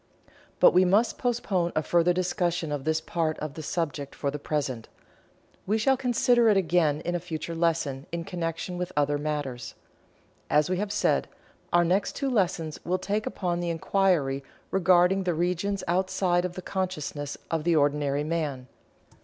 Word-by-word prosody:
But - - +7
we 180 +1 +6
must 200 +6 +2
postpone 205 -8 0
a 155 - +1
further 175 +2 +3
discussion 175 -2 -1
of 145 -2 -3
this 160 0 +1
part 160 -1 -2
of 155 -2 -5
the 160 - -7
subject 150 -3 -3
for 140 - -2
the 150 - -5
present. 140 -6 -3 0.8
We 215 +3 +2
shall 265 +5 +3
consider 245 -2 +3
it 205 - +4
again 160 -4 +2
in 175 - -2
a 175 - 0
future 170 -1 -5
lesson 165 -5 -1
in 170 0 -3
connection 175 0 -4
with 180 - -3
other 145 0 +2
matters. 145 -5 -4 0.7
As 150 +4 +3
we 185 - +1
have 205 +1 -2
said, 205 - +1 0.4
our 175 0 +4
next 185 +4 +1
two 275 -2 -1
lessons 175 -8 0
will 180 +2 0
take 205 +3 -2
upon 175 -2 -2
the 175 -1 -2
inquiry 165 -5 +1 0.3
regarding 185 +1 +4
the 175 -3 0
regions 180 +4 -1
outside 180 0 +1
of 180 - -4
the 185 - -7
consciousness 155 -7 -3
of 165 -2 0
the 170 0 +2
ordinary 145 -1 +1
man. 150 -5 -2
170 Hz, 170 wpm, -27 LUFS, 150-185 Hz, 0.8 s, But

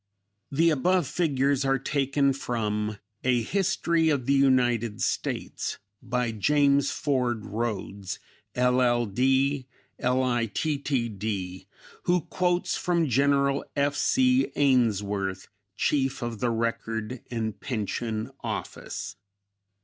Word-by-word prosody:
(The 165 +4 +4
above 175 +4 +2
figures 140 -3 +1
are 135 0 +2
taken 140 0 +1
from 105 -5 -2 0.3
a 125 -2 +2
"History 170 - +1
of 140 -5 0
the 140 - +3
United 120 -5 +2
States," - - -2 0.2
by 125 -1 -1
James 140 +5 +3
Ford 125 -6 -1
Rhodes, 105 -3 -3 0.4
LL.D., 125 +2 +2 0.3
Litt.D., 115 - -1 0.4
who 175 0 +3
quotes 175 +2 0
from 170 -4 +1
General 140 +2 +2
F. 140 0 +1
C. 255 - +3
Ainsworth, 105 -8 +1 0.3
Chief 135 -4 0
of 115 -2 -4
the 120 - +1
Record 115 0 -2
and 110 -4 -3
Pension 110 0 -3
Office.) - - -5
125 Hz, 95 wpm, -27 LUFS, 115-140 Hz, 0.4 s, The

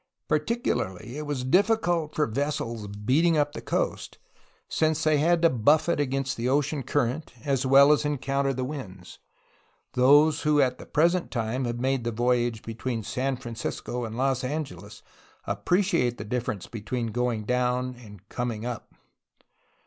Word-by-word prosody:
Particularly 150 - -1
was 145 -3 -3
it 130 - -4
difficult 180 -6 +2
for 150 - +2
vessels 115 -4 -3
beating 130 +12 +2
up 145 0 +2
the - - -6
coast, - - -2 0.5
since 155 0 +1
they 155 -2 +3
had 170 +2 +2
to 165 - +7
buffet 150 +8 +3
against 135 -1 -1
the 120 +2 -1
ocean 145 +1 +1
current 135 +3 -1
as 135 -2 0
well 140 +2 +7
as 150 - +3
encounter 140 -1 0
the 130 -1 -3
winds; 105 -10 -7 0.7
those 145 +5 +5
who 150 -1 +3
at 130 -3 +2
the - - -11
present 170 +3 +2
time 120 +2 -2
have 120 0 -3
made 130 0 0
the 120 - -1
voyage 120 -1 0
between 115 0 -4
San 130 +4 -2
Francisco 120 0 -5
and 115 0 -5
Los 130 0 +1
Angeles 125 - -5 0.4
appreciate 175 - +1
the - - -6
difference 110 -4 -3
between 115 +1 -4
going 120 -2 -1
down 125 +2 0
and 105 -5 -14
coming 120 -2 -3
up 120 -2 -6
130 Hz, 150 wpm, -26 LUFS, 120-150 Hz, 0.7 s, to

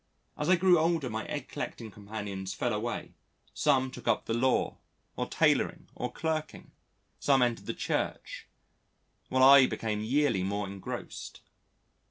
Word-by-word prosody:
As 150 - -2
I 185 - +7
grew 180 -1 +5
older 160 -6 +1
my 110 +1 -3
egg 145 -4 -4
collecting 115 -3 -6
companions 100 -2 -6
fell 120 - -1
away, 110 +3 -3 0.4
some 130 0 +2
took 125 -2 -10
up 115 - +2
the 115 - -2
law, 130 +3 +1 0.4
or - - -2
tailoring, - - +1
or 125 0 -4
clerking, 155 +2 -4 0.5
some 135 -3 +4
entered 120 -2 -1
the - - -3
Church, - - -3 0.8
while 130 0 +3
I 135 -1 +9
became 105 -2 -3
yearly 130 -2 +1
more 100 +2 -1
engrossed. 95 -1 -7
125 Hz, 145 wpm, -30 LUFS, 105-145 Hz, 0.8 s, I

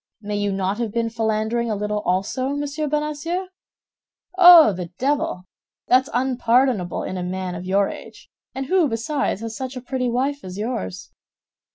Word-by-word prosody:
May 210 -1 -4
you 205 0 0
not 195 +2 -1
have 230 -3 -2
been 230 +1 -1
philandering 225 +1 -1
a 215 - 0
little 210 +1 -2
also, 195 +9 0
Monsieur 290 +1 -3
Bonacieux? 300 +5 -2 0.9
Oh, 350 - +9
the 180 -1 -5
devil! 270 -9 -1 0.5
That's 255 +2 +4
unpardonable 245 -5 +1
in 185 - -4
a 180 - -3
man 185 0 -4
of 175 +1 -6
your 195 +1 +2
age, - - -10 0.3
and 270 0 -3
who 360 +2 +3
besides, 250 -1 -2
has 225 -1 -5
such 260 +1 -5
a - - -3
pretty 255 0 -2
wife 270 +4 -1
as 185 0 -8
yours." 95 - -4
235 Hz, 165 wpm, -22 LUFS, 200-275 Hz, 0.9 s, Oh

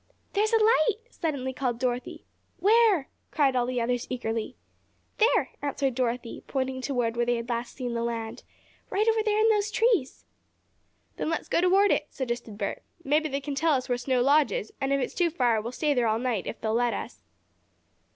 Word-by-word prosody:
"There's 425 +2 +2
a 455 - +5
light!" 435 -2 +3
suddenly 275 -5 -3
called 250 -3 -2
Dorothy. 250 0 -3 0.3
"Where?" 425 -7 +4 0.2
cried 275 -4 +2
all 245 -1 +1
the 250 -1 -1
others 240 +1 -1
eagerly. 230 -1 -3 0.6
"There," 450 +3 +3
answered 280 -2 -1
Dorothy, 240 -1 -2
pointing 260 -1 -2
toward 245 -4 -1
where 240 0 +1
they 240 - +2
had 235 +1 -5
last 235 0 -3
seen 250 -2 -4
the 235 - -1
land. 230 -1 -4 0.5
"Right 425 +3 +1
over 450 0 +3
in 430 0 +3
those 420 -1 +2
trees." 425 - +1 0.9
"Then - - -2
let's 330 - -2
go - - +2
toward 385 +3 +4
it," 295 - +1
suggested 235 -5 -4
Bert. 200 -2 -3 0.2
"Maybe 305 +2 +1
they 275 0 -2
can 285 +1 -4
tell 315 +3 +2
us 260 -2 -1
where 245 - 0
Snow 250 0 +1
Lodge 285 -2 +4
is, 205 - -4
and 270 0 0
if 275 - +2
it's 255 - -2
too 350 -2 +2
far 245 -8 +1
we'll 235 +3 -5
stay 295 +3 0
there 245 -3 +1
all 220 0 +2
night, 235 -5 -2
if - - -5
they'll 220 0 -1
let 240 +1 +1
us." - - -7
260 Hz, 195 wpm, -27 LUFS, 240-325 Hz, 0.9 s, a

